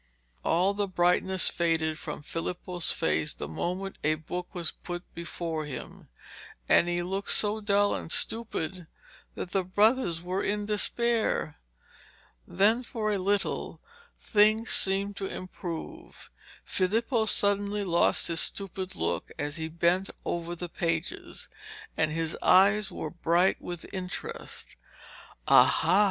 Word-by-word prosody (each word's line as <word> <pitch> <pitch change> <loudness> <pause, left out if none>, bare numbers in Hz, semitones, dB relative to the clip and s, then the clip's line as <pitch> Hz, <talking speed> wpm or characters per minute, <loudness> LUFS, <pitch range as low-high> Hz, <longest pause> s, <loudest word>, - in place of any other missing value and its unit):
All 180 +4 +2
the 205 0 -1
brightness 185 +1 +3
faded 160 -2 0
from 150 -1 -6
Filippo's 175 +2 -2
face 75 0 0
the 70 - -6
moment 180 - -4
a 155 +1 +2
book 175 +3 -6
was 175 -4 -2
put 175 0 -7
before 165 -2 -4
him, 140 - -8 0.6
and 170 - +5
he 175 0 0
looked 195 +3 -3
so 215 +1 +3
dull 205 0 +2
and 165 - -5
stupid 185 -7 -1 0.5
that 180 - -6
the 195 -1 +1
brothers 185 -2 +2
were 185 +2 -2
in 205 0 -1
despair. 215 -5 0 0.9
Then 220 +5 +3
for 225 -3 -3
a 200 - 0
little 200 +2 -1 0.4
things 215 +1 +3
seemed 195 +1 +2
to 195 - -3
improve. 185 - -8 0.3
Filippo 220 +4 0
suddenly 205 0 +2
lost 170 -3 +3
his 165 -1 +1
stupid 190 -1 0
look - - -2
as 145 +2 -2
he 160 0 -3
bent 170 +4 +1 0.2
over 170 0 -3
the 175 +1 -5
pages, 165 0 -3 0.5
and 155 -1 +1
his 165 0 +1
eyes 200 +2 +5
were 155 - -5
bright 175 +2 +2
with 175 -2 -6
interest. 185 -1 -6 0.7
'Aha!' 190 - +5
185 Hz, 130 wpm, -28 LUFS, 170-205 Hz, 0.9 s, and